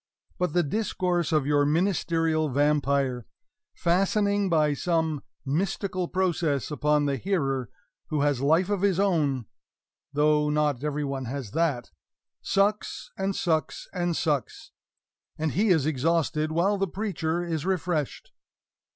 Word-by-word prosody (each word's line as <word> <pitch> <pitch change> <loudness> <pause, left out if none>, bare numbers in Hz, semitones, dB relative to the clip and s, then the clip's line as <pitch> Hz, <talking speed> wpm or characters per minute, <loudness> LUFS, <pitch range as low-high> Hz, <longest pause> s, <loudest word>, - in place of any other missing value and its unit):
But 180 -4 0
the 175 - +3
discourse 180 -1 -1
of 155 -4 +2
your 145 0 +3
ministerial 165 -1 +1
vampire, 140 -3 +1 0.5
fastening 200 +3 +1
by 155 -3 +3
some 160 -2 0 0.2
mystical 185 +4 -1
process 170 -7 0
upon 150 +1 +2
the 140 -1 0
hearer 135 - -1 0.4
who 150 -2 -1
has 145 -3 +1
life 165 +7 +3
of 200 -3 0
his 195 -2 +2
own 150 - +1 0.7
though 150 +1 +2
not 150 -3 0
every 150 0 -1
one 135 -2 -3
has 125 -3 -5
that 145 - 0 0.5
sucks 200 0 0
and 195 0 -2
sucks 160 -3 -1
and 175 -3 -1
sucks; 145 -5 -2 0.7
and 155 -1 -1
he 210 +4 +1
is 160 -7 +3
exhausted 155 +1 0
while 190 +5 +1
the 195 - +1
preacher 175 -4 -2
is 165 -4 -2
refreshed. 175 -5 -2
160 Hz, 130 wpm, -26 LUFS, 145-180 Hz, 0.7 s, the